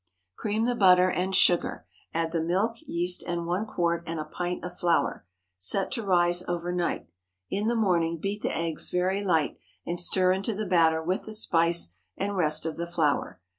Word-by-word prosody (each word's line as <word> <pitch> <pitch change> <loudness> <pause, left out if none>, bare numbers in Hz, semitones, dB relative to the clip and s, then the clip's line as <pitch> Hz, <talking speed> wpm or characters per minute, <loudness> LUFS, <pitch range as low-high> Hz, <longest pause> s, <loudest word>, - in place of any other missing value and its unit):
Cream 215 +1 -1
the 245 - +1
butter 185 -4 +5
and 185 +2 -1
sugar, 175 -2 +2 0.3
add 165 0 -1
the 165 -1 0
milk, 190 +8 +1
yeast, 175 -1 0
and 170 -1 -2
one 180 +6 -1
quart 170 -2 0
and 165 -1 -3
a 155 - -3
pint 180 +3 -4
of 180 0 -7
flour. 170 - +1 0.3
Set 190 - 0
to 245 - -1
rise 175 -2 +3
over 175 0 -2
night. 175 -1 -1 0.5
In 205 +3 0
the 235 - +1
morning 170 -6 +1
beat 200 +5 -3
the - - -1
eggs 165 -1 -2
very 185 +3 0
light, 165 -6 +1 0.3
and 175 0 -3
stir 185 +1 +3
into 195 +3 -1
the 215 +1 -3
batter 165 -3 +3
with 180 +3 -1
the 220 - -6
spice 170 - +2 0.3
and 200 +1 -2
rest 155 -3 +1
of 160 - -3
the 170 0 -3
flour. 160 -4 0
175 Hz, 190 wpm, -27 LUFS, 170-195 Hz, 0.5 s, butter